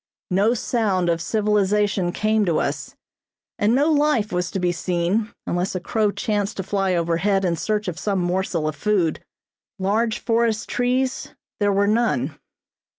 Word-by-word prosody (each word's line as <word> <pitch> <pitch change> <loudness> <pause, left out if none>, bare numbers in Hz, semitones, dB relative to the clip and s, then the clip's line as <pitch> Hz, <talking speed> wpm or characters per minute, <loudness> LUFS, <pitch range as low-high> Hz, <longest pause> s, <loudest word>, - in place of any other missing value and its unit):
No 205 +6 +3
sound 205 -7 0
of 165 -1 0
civilization 205 -1 +1
came 215 +3 +1
to 165 -3 +2
us, - - -3 0.6
and 215 +3 +3
no 290 +4 +3
life 290 -8 +2
was 180 -1 -1
to 195 - -3
be 180 -1 +1
seen 180 +5 -1
unless 175 +2 -1
a - - 0
crow 210 +4 0
chanced 205 0 -2
to 190 - -2
fly 195 -1 0
overhead 175 +4 +1
in 170 -2 +1
search 210 +5 -2
of 170 -3 -4
some 200 +3 -1
morsel 175 -3 -1
of 155 - -2
food. 180 -1 0 0.5
Large 215 +4 0
forest 230 -2 0
trees 255 +1 -1 0.2
there 205 -1 +2
were 200 +1 +2
none. 230 +3 +1
200 Hz, 155 wpm, -22 LUFS, 180-220 Hz, 0.6 s, No